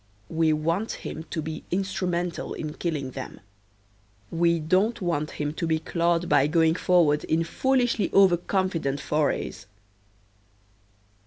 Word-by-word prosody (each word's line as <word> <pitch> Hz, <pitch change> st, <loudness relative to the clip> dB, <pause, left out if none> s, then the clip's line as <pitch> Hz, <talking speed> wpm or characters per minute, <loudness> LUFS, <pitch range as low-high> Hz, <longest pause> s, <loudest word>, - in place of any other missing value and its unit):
We 160 Hz, -1 st, +2 dB
want 165 Hz, +8 st, 0 dB
him 160 Hz, +1 st, -6 dB
to 160 Hz, -, -3 dB
be 155 Hz, 0 st, -6 dB
instrumental 180 Hz, -2 st, -2 dB
in 155 Hz, -1 st, -5 dB
killing 150 Hz, -7 st, -3 dB
them. 130 Hz, 0 st, -7 dB, 0.9 s
We 170 Hz, 0 st, +2 dB
don't 185 Hz, +9 st, +1 dB
want 165 Hz, -5 st, -1 dB
him 150 Hz, 0 st, -2 dB
to 165 Hz, +1 st, -3 dB
get 160 Hz, 0 st, -1 dB
clawed 170 Hz, 0 st, +1 dB
by 135 Hz, -, +4 dB
going 160 Hz, 0 st, +3 dB
forward 165 Hz, -4 st, +3 dB
in 165 Hz, +1 st, +1 dB
foolishly 245 Hz, +4 st, +1 dB
overconfident 180 Hz, -5 st, +2 dB
forays. 145 Hz, -9 st, -1 dB
165 Hz, 125 wpm, -26 LUFS, 155-180 Hz, 0.9 s, by